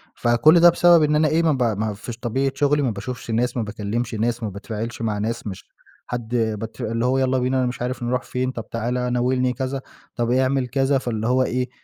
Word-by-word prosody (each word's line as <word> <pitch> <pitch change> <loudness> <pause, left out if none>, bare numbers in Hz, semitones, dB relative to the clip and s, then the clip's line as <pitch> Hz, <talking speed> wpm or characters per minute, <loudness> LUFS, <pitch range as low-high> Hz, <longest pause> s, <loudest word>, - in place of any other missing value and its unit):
فكل 120 +8 +4
ده 175 +1 +8
بسبب 170 -1 +5
إن 150 0 +2
أنا 155 0 +3
إيه، 165 +2 +2
ما 160 - +3
ب 130 -3 +1 0.2
ما 110 -1 -1
فيش 115 +3 -8
طبيعة 130 +3 -1
شغلي، 145 0 +2
ما 130 - +1
باشوفش 115 +3 -6
ناس، 120 +2 0
ما 115 - 0
باكلّمش 110 +3 -3
ناس، 115 +2 -1
ما 105 - -1
باتفاعلش 110 +4 -6
مع 110 -2 -1
ناس 115 +1 -3
مش 95 -2 -7 0.4
حد 120 0 -4
بت 110 -1 -2
اللي 115 +2 -1
هو 130 +1 +2
يالّا 130 0 +2
بينا 130 +1 +1
أنا 130 - +2
مش 125 0 -4
عارف 125 0 -3
نروح 125 +1 -1
فين، 130 0 -2
طب 115 -3 -8
تعالَ، 125 +2 -2
ناولني 125 +1 +1
كذا، 135 +1 -3 0.3
طب 120 0 0
اعمل 130 0 +2
كذا، 135 +2 +1
فاللي 115 -4 -2
هو 130 +1 +3
إيه، 125 0 -1
125 Hz, 225 wpm, -22 LUFS, 115-130 Hz, 0.4 s, ده